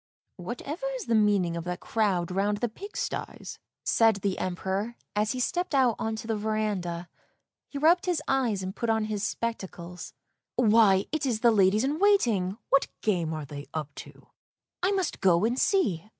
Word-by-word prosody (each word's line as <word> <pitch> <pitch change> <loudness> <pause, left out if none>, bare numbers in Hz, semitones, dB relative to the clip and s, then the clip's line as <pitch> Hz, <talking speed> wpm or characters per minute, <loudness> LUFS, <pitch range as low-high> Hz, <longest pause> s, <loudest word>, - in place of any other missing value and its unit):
" - - -55
Whatever 250 - -5
is - - -5
the 235 - 0
meaning 205 -6 +3
of 170 - -4
that 180 -1 -3
crowd 190 -6 0
round 200 +2 +1
the 240 - 0
pig 400 - -9
sties? - - -5
" - - -64
said 225 -2 +4
the 195 -1 -2
Emperor 190 +5 -2 0.2
as 210 +2 +1
he 255 - -4
stepped 350 +5 -1
out 255 -4 +4
on 220 0 -1
to 220 - -7
the 225 -1 -1
verandah; 205 -5 -2 0.6
he 285 - -6
rubbed 335 +5 +4
his 350 -4 +1
eyes 240 -8 +1
and 185 +1 -5
put 235 - -2
on 220 -1 +2
his 215 -2 -3
spectacles. 190 -6 -4 0.2
" - - -61
Why, 210 -4 +5
it 305 -3 -1
is 225 -4 -1
the 235 - +6
ladies 205 +1 +4
in 290 +4 -1
waiting, 230 - +3
what 275 - +4
game 175 -7 0
are 155 -2 -4
they 145 +1 -8
up 150 -2 -4
to? - - -11 0.6
I 365 - +2
must 380 -4 -1
go 180 +1 +4
and 240 +3 0
see! 215 - +1
215 Hz, 195 wpm, -27 LUFS, 185-250 Hz, 0.6 s, the